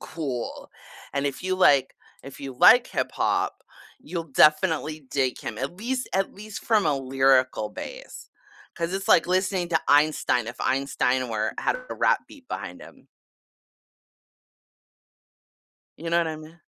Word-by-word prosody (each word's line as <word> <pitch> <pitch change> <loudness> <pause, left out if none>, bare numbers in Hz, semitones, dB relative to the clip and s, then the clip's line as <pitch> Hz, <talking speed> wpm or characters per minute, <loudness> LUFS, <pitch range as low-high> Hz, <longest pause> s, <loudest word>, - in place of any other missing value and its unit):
cool, 135 -7 -5 0.4
and 140 0 -1
if 140 - -4
you 185 0 0
like 140 -8 +4 0.3
if 140 - -11
you 135 -2 -7
like 245 +2 +7
hip - - -2
hop, - - -1 0.4
you'll 180 -11 -5
definitely 155 -1 +3
dig 130 -2 0
him, - - -6
at 140 +6 -4
least 250 +4 -3
at 195 0 0
least 215 +1 -9
from 215 -3 +2
a 145 - +2
lyrical 130 -3 +2
base. - - -9 0.5
'Cause 170 +1 -2
it's 195 +1 -3
like 165 - +5
listening 185 -1 0
to 160 -2 +2
Einstein, 145 -5 +3
if - - -7
Einstein 130 -2 0
were 110 -1 -1
had - - 0
a - - -3
rap - - +2
beat 275 -3 -16
behind - - -6
him. - - -16 2.9
You 165 - -5
know 170 - +3
what 170 - +1
I 160 -1 -4
me 155 +1 -12
155 Hz, 150 wpm, -25 LUFS, 135-185 Hz, 2.9 s, like